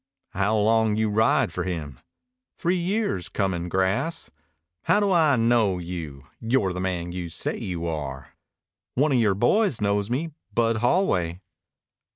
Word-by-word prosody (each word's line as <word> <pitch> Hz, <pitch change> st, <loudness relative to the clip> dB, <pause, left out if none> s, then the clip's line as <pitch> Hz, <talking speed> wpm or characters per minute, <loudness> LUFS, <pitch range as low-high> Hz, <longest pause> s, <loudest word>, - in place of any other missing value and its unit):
"How 100 Hz, +3 st, +1 dB
long 110 Hz, 0 st, +3 dB
you 110 Hz, -1 st, +1 dB
ride 110 Hz, +2 st, +2 dB
for -, -, -2 dB
him?" 75 Hz, -8 st, -5 dB, 0.6 s
"Three 180 Hz, +1 st, +1 dB
years 185 Hz, -, -1 dB
comin' 90 Hz, -3 st, -2 dB
grass." 95 Hz, -, -1 dB, 0.5 s
"How 205 Hz, -, +4 dB
do 205 Hz, -2 st, +1 dB
I 160 Hz, -6 st, +4 dB
knew 115 Hz, -5 st, +2 dB
you 85 Hz, -6 st, -7 dB
you're 115 Hz, -5 st, +1 dB
the 90 Hz, -, -4 dB
man 90 Hz, -2 st, -2 dB
you 90 Hz, -1 st, -5 dB
say -, -, -3 dB
you 85 Hz, -2 st, -4 dB
are?" 70 Hz, -5 st, -5 dB, 0.6 s
"One 145 Hz, +4 st, +2 dB
of 130 Hz, -, +3 dB
yore 105 Hz, -4 st, +3 dB
boys 150 Hz, -, +2 dB
knows 100 Hz, 0 st, 0 dB
me 150 Hz, +7 st, -2 dB, 0.2 s
Bud 115 Hz, +1 st, +1 dB
Holway." 95 Hz, -, +1 dB
105 Hz, 150 wpm, -25 LUFS, 90-125 Hz, 0.6 s, How